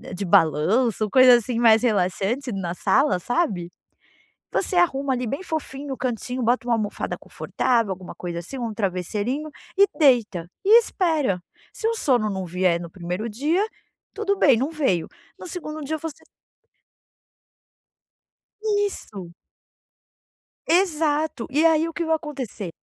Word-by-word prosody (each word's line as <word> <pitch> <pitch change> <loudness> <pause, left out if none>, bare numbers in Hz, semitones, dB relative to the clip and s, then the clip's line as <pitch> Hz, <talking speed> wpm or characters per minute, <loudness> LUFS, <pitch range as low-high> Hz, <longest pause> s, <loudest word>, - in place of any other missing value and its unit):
de 200 +2 -3
balanço 180 - +3
ou 210 - -6
coisa, 255 -2 +8
assim, 240 0 -1
mais 225 -2 +6
relaxante 215 +4 0
na 190 -4 -3
sala, 230 +2 +2
sabe? 190 - -1 0.8
Você 370 - 0
arruma 280 -6 +2
ali 250 0 -3
bem 275 +10 -3
fofinho 290 -4 -5
no 265 - -4
cantinho, 250 0 -3
bota 240 +1 +1
uma 235 - +3
almofada 210 -2 -3
confortável, 230 -5 -1
alguma 185 -1 -9
coisa 170 -1 -5
assim, 225 +11 -8
um 230 -3 -4
travesseirinho 210 - -2 0.3
e 400 - +7
deita 235 - +3 0.2
e 435 +4 +8
espera. 315 - 0 0.3
Se 445 - -2
o 460 - 0
sono 250 - +1
não 190 -1 -3
vier 175 0 +1
no 170 -1 -8
primeiro 180 +5 -4
dia 305 - +1 0.5
tudo 400 -2 -1
bem, 270 -6 +5
não 270 +6 -1
veio. 265 - 0 0.3
No - - -8
segundo 310 -4 -6
dia 295 +2 -3
eu - - -12
você 320 -2 -7 2.6
Isso. 195 - -7 1.3
Exato. 315 -6 +1
E 300 +5 +2
aí 320 0 +4
o - - -9
que 340 - -2
vai 320 0 +2
acontecer? 270 - -6
250 Hz, 145 wpm, -23 LUFS, 195-305 Hz, 2.6 s, coisa